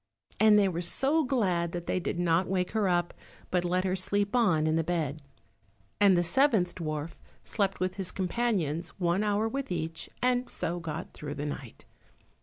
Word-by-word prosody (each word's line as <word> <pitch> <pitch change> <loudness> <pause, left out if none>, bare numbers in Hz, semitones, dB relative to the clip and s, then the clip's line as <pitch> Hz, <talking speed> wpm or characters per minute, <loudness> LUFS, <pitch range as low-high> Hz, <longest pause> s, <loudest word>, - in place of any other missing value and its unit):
and 215 -1 +6
they 200 -1 +4
were 175 -2 -2
so 275 - +2
glad 185 - 0
that 175 -1 -4
they - - 0
did 175 - -3
not 175 +1 +2
wake 185 -1 -1
her 210 -3 +1
up, 175 -1 +1 0.4
but 180 -1 +2
let 180 +1 +1
her 185 0 0
sleep 200 +3 0
on 180 -11 +3
in 155 0 +2
the 165 - +2
bed. 160 -3 -2 0.8
And 200 -3 +6
the 175 - +3
seventh 210 - +3
dwarf 155 -1 -4 0.3
slept 195 -3 -1
with 185 +1 -2
his 190 -2 -2
companions, 185 -5 -1
one 175 +3 +1
hour 210 +1 +1
with 270 -1 -4
each, 165 -1 -3
and 250 0 +1
so 175 +2 -3
got 165 0 -6
through 150 -1 -6
the 145 +1 -4
night. 140 -5 -7
180 Hz, 185 wpm, -29 LUFS, 165-205 Hz, 0.8 s, and